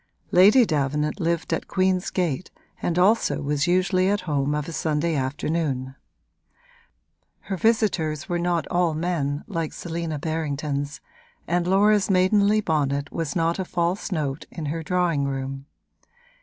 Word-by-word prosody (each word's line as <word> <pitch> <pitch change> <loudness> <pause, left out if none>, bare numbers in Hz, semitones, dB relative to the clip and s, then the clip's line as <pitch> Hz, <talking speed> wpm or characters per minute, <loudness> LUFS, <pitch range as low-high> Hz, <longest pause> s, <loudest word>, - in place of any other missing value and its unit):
Lady 210 +7 +7
Davenant 150 0 -1
lived 170 -1 -1
at - - -2
Queen's 185 -1 +1
Gate 175 -3 -2 0.3
and 175 - -1
also 205 +6 +3
was 145 +2 0
usually 185 +1 +2
at 205 +1 +1
home 145 -4 0
of 150 -1 -3
a - - -5
Sunday 160 +1 0
afternoon: 135 -1 -2 1.5
her 195 - -4
visitors 185 -8 +1
were 175 -2 -1
not 170 -2 0
all 175 -3 +1
men, 155 -4 -1
like 165 -6 -3
Selina 165 -2 -4
Berrington's, 145 -2 -3 0.5
and 175 +1 0
Laura's 205 +2 +3
maidenly 200 +3 +3
bonnet 145 -5 -1
was 165 -3 -3
not 165 +1 +1
a - - 0
false 180 +3 -2
note 150 -3 -2
in 160 - -6
her 165 - -4
drawing 170 -3 0
room. 135 0 -4
165 Hz, 140 wpm, -24 LUFS, 150-185 Hz, 1.5 s, Lady